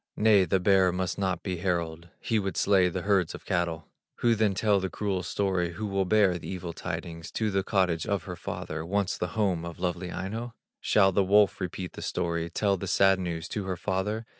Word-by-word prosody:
Nay, 105 -3 +5
the 95 +3 +1
bear 95 0 +4
must 90 +1 -2
not 95 -3 -1
be 90 -2 -2
herald, 85 -2 -2
He 115 -2 0
would 95 -3 -3
slay 95 -3 +4
the 90 0 -4
herds 95 -5 +1
of - - -12
cattle. 85 -4 -1 0.3
Who 120 -1 +2
then 110 -3 +1
tell 105 0 +3
the 95 0 -2
cruel 100 -2 -2
story, 90 -1 -1
Who 110 +5 -4
will 100 -1 0
bear 95 -2 +3
the - - -8
evil 90 -2 -5
tidings 85 -1 -6
To 110 -2 0
the 95 0 +1
cottage 95 -5 0
of 100 -4 0
her 90 - -6
father, 80 -2 -5
Once 100 +2 0
the 90 +4 -4
home 95 -6 +1
of 85 -1 -7
lovely 90 0 -2
Aino? 115 +5 -5 0.2
Shall 95 -2 +4
the 100 +1 +2
wolf 100 +1 +4
repeat 90 0 -4
the - - -8
story, 85 -1 -2
Tell 100 +3 +1
the 95 - -5
sad 95 +1 +4
news 85 -3 -3
to 105 -3 -3
her 95 -2 -3
father? 105 +5 -2
95 Hz, 215 wpm, -28 LUFS, 85-100 Hz, 0.3 s, Nay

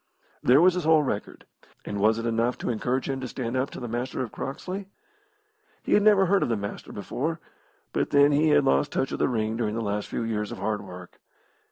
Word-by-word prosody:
There 130 +5 +5
was 185 +1 +6
his 180 -1 -2
whole 160 -1 +5
record, 105 -7 -4 0.4
and 100 - -4
was 110 +2 +3
it 115 - -3
enough 115 +1 0
to - - -2
encourage 125 +3 -1
him 135 -1 -3
to 130 - -4
stand 120 0 -4
up 130 +2 0
to - - -8
the 120 - -5
Master 120 +3 -3
of 120 - -7
Croxley? 185 +8 -5 1.0
He - - 0
had 205 - +5
never 205 -2 +5
heard 195 +2 +3
of - - 0
the 115 - +1
Master 100 0 -6
before, 150 - -3 0.5
but - - 0
then 145 0 +5
he 150 +2 +3
had 150 - +4
lost 70 +1 +2
touch 135 - -1
of - - -4
the - - +2
ring 110 -2 -1
during 110 -2 -1
the - - -2
last 105 0 -2
few - - -3
years 105 -2 -2
of - - -6
hard 105 -1 -2
work. 90 -2 -11
125 Hz, 230 wpm, -26 LUFS, 110-145 Hz, 1.0 s, was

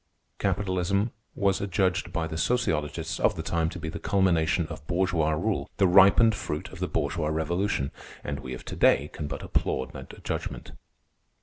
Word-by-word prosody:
Capitalism 100 +2 0 0.2
was 100 -2 +1
adjudged 95 -2 0
by 85 -1 -1
the 80 0 -5
sociologists 95 - -1
of - - +3
the 80 - -4
time 80 0 0
to 95 - -7
be 80 -2 -6
the 80 - -5
culmination 85 -4 +2
of 80 -2 -9
bourgeois 85 -3 +1
rule, 95 +6 -1
the 100 - +4
ripened 100 +5 +7
fruit 90 0 -4
of 95 - -11
the 90 - -1
bourgeois 75 +1 -1
revolution. 80 -1 0 0.3
And 70 -1 -3
we 65 0 -6
of - - -11
to - - -6
day - - +3
can 75 - -4
but 75 - -5
applaud 65 - -1
that - - -10
judgment. - - -4
90 Hz, 175 wpm, -27 LUFS, 80-95 Hz, 0.3 s, ripened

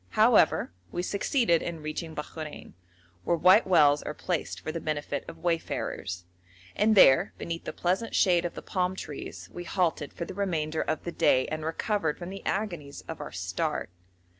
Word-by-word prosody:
However, - - +5 0.2
we 175 - -2
succeeded 200 - +2
in 165 -3 -5
reaching 155 +1 -4
Bakhrein, 150 - -7 0.5
where 170 - +1
white 185 +6 +6
wells 150 -5 +5
are 150 - -5
placed 175 -3 -2
for 155 - -4
the 165 - -4
benefit 145 -2 -3
of 165 - -8
wayfarers, 100 - -2 0.5
and 215 +1 +3
there 135 -9 +6
beneath 165 0 -5
the - - -3
pleasant 190 +6 -1
shade 175 -3 +4
of 175 - -4
the - - -7
palm 185 -1 -1
trees 95 - -7
we 175 - -6
halted 170 -5 0
for 170 - -5
the - - -7
remainder 160 -5 -1
of 155 - -2
the 175 - -4
day 130 -5 +3
and 155 0 -3
recovered 165 0 -1
from 175 +1 -7
the 195 - -8
agonies 175 -9 -3
of 160 - -6
our - - -6
start. 90 +1 -2
165 Hz, 175 wpm, -28 LUFS, 150-185 Hz, 0.5 s, white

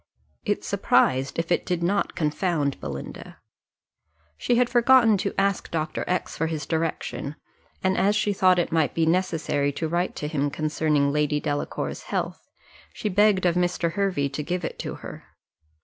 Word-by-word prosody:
It - - 0
surprised, 130 +1 +2
if 165 +1 -2
it - - +2
did 175 -1 -2
not 200 +3 0
confound, 150 -2 0
Belinda. 70 0 -7 1.0
She 240 - 0
had 245 0 +3
forgotten 240 -2 +5
to - - -3
ask 195 -1 0
Dr. 155 -1 -2
X 180 - -1
for 160 - 0
his 155 -2 -3
direction; 160 -3 -2 0.5
and 190 0 +2
as 205 +2 +2
she 210 -1 +1
thought 185 -1 +4
it 175 - 0
might 160 -2 +1
be 165 - +2
necessary 160 -5 +1
to 160 - -2
write 175 +3 -1
to 150 - -4
him 145 -2 0
concerning 150 -1 +1
Lady 150 0 +1
Delacour's 145 -1 -3
health, - - -2 0.5
she 210 - -3
begged 205 -1 +3
of 175 - +4
Mr. 175 -1 0
Hervey 190 -7 0
to 140 +2 -4
give 180 +3 -2
it - - -6
to - - -4
her. - - -8
165 Hz, 165 wpm, -25 LUFS, 150-185 Hz, 1.0 s, forgotten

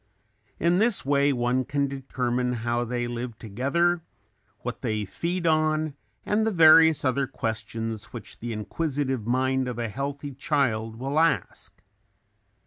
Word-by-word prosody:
In 170 +2 +3
this 220 - +3
way 140 0 +3
one 125 0 +1
can 140 +1 0
determine 125 -2 -2
how 120 0 +1
they 120 0 -2
live 120 -1 -5
together, 140 - 0 0.6
what - - -5
they 105 -1 -1
feed 170 - -3
on 155 -1 +2 0.3
and 210 +1 +1
the 225 - +2
various 160 -4 +6
other 135 +1 +1
questions 115 0 -4
which 100 -6 -10
the 120 +1 -5
inquisitive 130 +1 -2
mind 130 +1 +1
of 125 -2 -4
a 115 -1 -2
healthy 140 +5 -4
child 120 -6 0
will 135 +6 -1
ask. 155 - -1
130 Hz, 135 wpm, -26 LUFS, 120-155 Hz, 0.6 s, various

